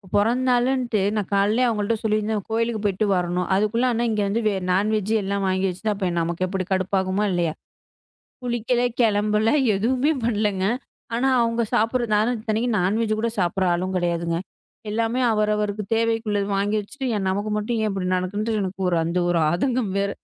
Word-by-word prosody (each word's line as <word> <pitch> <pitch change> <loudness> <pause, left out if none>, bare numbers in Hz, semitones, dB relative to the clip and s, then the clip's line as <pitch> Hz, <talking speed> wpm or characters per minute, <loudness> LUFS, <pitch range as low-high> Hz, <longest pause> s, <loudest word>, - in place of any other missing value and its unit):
பொறந்த 230 +5 +2
நாளுன்ட்டு 245 -2 +1 0.2
நான் 210 -3 -2
காலையில 205 +5 +3
அவங்க 220 -3 0
கிட்ட 225 +3 +1
சொல்லியிருந்தேன், 215 -1 0
"கோயிலுக்குப் 225 -1 -1
போயிட்டு 200 +2 +1
வரணும்." 180 0 -1
அதுக்குள்ள 215 +5 +1
ஆனா, 235 +1 0
இங்க 210 -1 0
வந்து 215 +4 0
வே 210 - +2 0.2
நான் 200 +4 +2
வெஜ் 210 +1 -1
எல்லாம் 200 0 -1
வாங்கி 185 0 +1
வெச்சிட்டா, 210 +4 -2
அப்ப 190 -3 -1
நமக்கு 170 +2 -1
எப்படி 185 0 -3
கடுப்பாகுமா 190 +1 0
இல்லையா? 170 -3 0 0.9
குளிக்கல, 240 0 0 0.2
கிளம்பல, 210 -1 +2 0.3
எதுவுமே 255 +9 +1
பண்ணலங்க. 210 -4 0 0.5
ஆனா, 250 +3 +1
அவங்க 230 0 0
சாப்பிடுறது 230 0 +1
நான் 230 +3 +1
இத்தனைக்கும் 220 +1 -1
நான் 190 +4 +1
வெஜ் 215 -1 0
கூடச் 230 -1 -2
சாப்பிடுற, 185 +1 +1
ஆளும் 185 +2 -2
கெடையாதுங்க. 170 -1 0 0.5
எல்லாமே 230 +3 0
அவர் 215 0 +1
அவர்வருக்குத் 210 0 -3
தேவைக்கு 225 0 0
உள்ளது. 205 -1 0
வாங்கி 205 +2 0
வெச்சுட்டு, 265 +6 -6
"ஏன் 195 -2 -1
நமக்கு 205 +3 -2
மட்டும் 225 +2 -2
ஏன் 215 - 0
இப்படி 190 -2 -2
நடக்குன்டு" 210 +4 -2
எனக்கு 190 0 -5
ஒரு 170 - +2
அந்த 170 +2 -1
ஒரு 170 -1 +2
ஆதங்கம் 235 - 0
வேற. 200 0 0
210 Hz, 175 wpm, -23 LUFS, 190-230 Hz, 0.9 s, காலையில